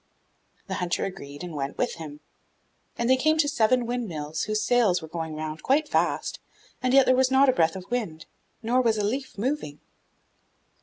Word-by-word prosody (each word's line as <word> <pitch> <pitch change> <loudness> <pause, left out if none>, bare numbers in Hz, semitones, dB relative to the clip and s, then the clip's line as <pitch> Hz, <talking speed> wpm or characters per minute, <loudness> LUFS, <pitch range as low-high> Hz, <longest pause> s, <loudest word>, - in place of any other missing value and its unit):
The - - -5
hunter 175 0 0
agreed 145 -6 -8
and 175 -2 -6
went 140 -2 -4
with 245 - 0
him, 150 -2 -9 0.8
and 235 - 0
they 260 +1 +5
came 310 +4 +2
to 305 -2 +3
seven 245 -2 +2
windmills 165 -11 -3
whose 215 0 -1
sails 220 -6 +3
were 160 - -9
going 160 -1 -5
round 155 0 -5
quite 300 +3 +2
fast, - - 0 0.4
and 255 - +1
yet 270 0 +6
there 255 - +4
was 260 0 +3
not 265 +1 +5
a - - +4
breath 165 -7 +2
of 185 -1 -7
wind, 175 -11 -3 0.4
nor 245 +3 +2
was 225 -3 +2
a 210 - 0
leaf 260 +3 -3
moving. 220 - -2
215 Hz, 190 wpm, -26 LUFS, 160-255 Hz, 0.8 s, yet